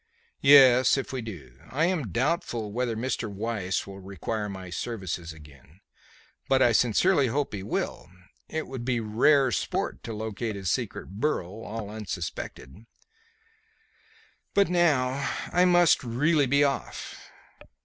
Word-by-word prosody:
"Yes, 130 Hz, -2 st, +7 dB
if 135 Hz, -, -4 dB
we 130 Hz, -, -2 dB
do. 85 Hz, -, -10 dB
I 155 Hz, +5 st, +1 dB
am 165 Hz, -, -1 dB
doubtful 120 Hz, -, -1 dB
whether 120 Hz, +1 st, -1 dB
Mr. 120 Hz, -2 st, -2 dB
Weiss 100 Hz, -2 st, -2 dB
will 100 Hz, 0 st, -10 dB
require 100 Hz, +3 st, -4 dB
my 95 Hz, -2 st, -8 dB
services 90 Hz, -5 st, -4 dB
again, 75 Hz, +1 st, -16 dB, 0.7 s
but 135 Hz, -, +4 dB
I 120 Hz, -2 st, +5 dB
sincerely 135 Hz, -, +3 dB
hope 140 Hz, +2 st, -1 dB
he 100 Hz, -, -4 dB
will. 95 Hz, -, -3 dB, 0.4 s
It 160 Hz, 0 st, -3 dB
would 130 Hz, -2 st, -7 dB
be 120 Hz, -1 st, 0 dB
rare 125 Hz, +5 st, +3 dB
sport -, -, -2 dB
to 115 Hz, -, -5 dB
locate 110 Hz, 0 st, -4 dB
his 95 Hz, -4 st, -2 dB
secret -, -, -3 dB
burrow, 110 Hz, -, -2 dB
all 110 Hz, -1 st, -6 dB
unsuspected. 100 Hz, -, -7 dB, 1.7 s
But 200 Hz, -2 st, +4 dB
now 140 Hz, -6 st, +1 dB, 0.2 s
I 180 Hz, +1 st, +5 dB
must 175 Hz, -4 st, +4 dB
really 145 Hz, +5 st, +2 dB
be 140 Hz, +3 st, +3 dB
off." 140 Hz, -2 st, -3 dB
115 Hz, 135 wpm, -27 LUFS, 100-140 Hz, 1.7 s, Yes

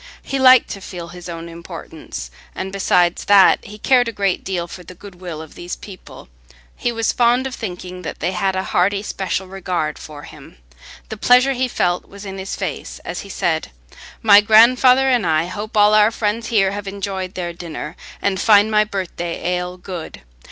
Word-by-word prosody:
He 275 Hz, -, -3 dB
liked 255 Hz, -1 st, +6 dB
to 195 Hz, -, -6 dB
feel 175 Hz, -3 st, -8 dB
his 175 Hz, 0 st, -10 dB
own 165 Hz, 0 st, -6 dB
importance, 170 Hz, -, -9 dB, 0.2 s
and 190 Hz, +1 st, -5 dB
besides 180 Hz, -3 st, +2 dB
that, 200 Hz, -2 st, +6 dB
he 210 Hz, +1 st, -10 dB
cared 245 Hz, +2 st, +3 dB
a -, -, -2 dB
great 200 Hz, -4 st, -1 dB
deal 180 Hz, -3 st, -3 dB
for 180 Hz, -, -10 dB
the 180 Hz, +1 st, -12 dB
good 185 Hz, -1 st, -13 dB
will 165 Hz, -4 st, -6 dB
of 160 Hz, -, -14 dB
these 175 Hz, 0 st, -6 dB
people: 190 Hz, -3 st, -12 dB, 0.5 s
he 240 Hz, -, -1 dB
was 225 Hz, -1 st, 0 dB
fond 245 Hz, +2 st, +2 dB
of 265 Hz, -, -4 dB
thinking 180 Hz, -4 st, -7 dB
that 165 Hz, -, -7 dB
they 175 Hz, -, -1 dB
had 190 Hz, +1 st, -1 dB
a 190 Hz, -, -1 dB
hearty, 195 Hz, +3 st, +1 dB
special 190 Hz, -2 st, -3 dB
regard 180 Hz, -5 st, -3 dB
for 150 Hz, -1 st, -10 dB
him. -, -, -13 dB, 0.5 s
The 220 Hz, -, -6 dB
pleasure 250 Hz, +5 st, +4 dB
he 255 Hz, 0 st, 0 dB
felt 180 Hz, -7 st, -1 dB
was 200 Hz, +1 st, -11 dB
in 195 Hz, 0 st, -6 dB
his 190 Hz, +1 st, -5 dB
face -, -, -5 dB
as -, -, -4 dB
he 200 Hz, -, -9 dB
said, 160 Hz, -4 st, -1 dB, 0.5 s
"My 205 Hz, -2 st, +8 dB
grandfather 250 Hz, +5 st, +6 dB
and 250 Hz, -4 st, +2 dB
I 160 Hz, -1 st, +1 dB
hope 210 Hz, +4 st, -6 dB
all 210 Hz, 0 st, +6 dB
our 215 Hz, 0 st, +6 dB
friends 225 Hz, +1 st, -2 dB
here 195 Hz, -5 st, +2 dB
have 205 Hz, 0 st, -6 dB
enjoyed 195 Hz, -1 st, -4 dB
their 175 Hz, -2 st, -4 dB
dinner, 165 Hz, -2 st, -7 dB, 0.3 s
and 195 Hz, -2 st, 0 dB
find 210 Hz, 0 st, +5 dB
my 210 Hz, 0 st, +4 dB
birthday 185 Hz, -4 st, -5 dB
ale 180 Hz, 0 st, -3 dB
good. 180 Hz, -, -8 dB
195 Hz, 195 wpm, -19 LUFS, 175-215 Hz, 0.5 s, My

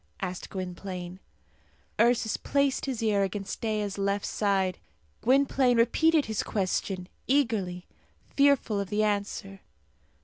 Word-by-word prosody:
asked 180 Hz, 0 st, -5 dB
Gwynplaine. 185 Hz, -1 st, -6 dB, 0.8 s
Ursus 235 Hz, -2 st, +3 dB
placed 280 Hz, -1 st, 0 dB
his 245 Hz, -4 st, -2 dB
ear 210 Hz, -2 st, +2 dB
against 195 Hz, 0 st, -3 dB
Dea's 210 Hz, -3 st, -2 dB
left 200 Hz, 0 st, 0 dB
side. 195 Hz, -3 st, 0 dB, 0.4 s
Gwynplaine 260 Hz, -1 st, +3 dB
repeated 310 Hz, +6 st, +3 dB
his 220 Hz, -1 st, -1 dB
question 185 Hz, -2 st, -2 dB, 0.2 s
eagerly, 215 Hz, -10 st, 0 dB, 0.5 s
fearful 280 Hz, -7 st, +3 dB
of 200 Hz, -2 st, -3 dB
the 210 Hz, +2 st, +1 dB
answer. 200 Hz, -2 st, -2 dB
205 Hz, 110 wpm, -28 LUFS, 195-245 Hz, 0.8 s, Ursus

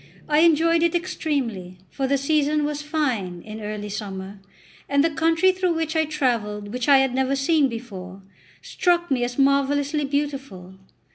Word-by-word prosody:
I 300 Hz, 0 st, +3 dB
enjoyed 330 Hz, 0 st, +4 dB
it 340 Hz, 0 st, +2 dB
extremely; 265 Hz, -, -3 dB
for 270 Hz, -1 st, -2 dB
the 280 Hz, +1 st, +2 dB
season 300 Hz, +1 st, +1 dB
was 295 Hz, 0 st, -3 dB
fine, 250 Hz, -, -2 dB
in 220 Hz, 0 st, -8 dB
early 210 Hz, 0 st, -5 dB
summer, 195 Hz, -1 st, -6 dB, 0.5 s
and 280 Hz, 0 st, +3 dB
the 330 Hz, -, +2 dB
country 330 Hz, +4 st, +3 dB
through 370 Hz, -2 st, 0 dB
which 320 Hz, 0 st, -2 dB
I 320 Hz, 0 st, +3 dB
travelled, 235 Hz, -9 st, -1 dB
and 205 Hz, +1 st, -9 dB
which 250 Hz, +3 st, -2 dB
I 280 Hz, -, +8 dB
had 265 Hz, -1 st, +2 dB
never 265 Hz, +1 st, +1 dB
seen 275 Hz, 0 st, +2 dB
before, 195 Hz, -5 st, -8 dB, 0.4 s
struck 345 Hz, -2 st, 0 dB
me 250 Hz, -2 st, +1 dB
as 245 Hz, 0 st, -3 dB
marvellously 280 Hz, +2 st, +2 dB
beautiful. 275 Hz, -10 st, -4 dB
275 Hz, 165 wpm, -23 LUFS, 220-310 Hz, 0.5 s, I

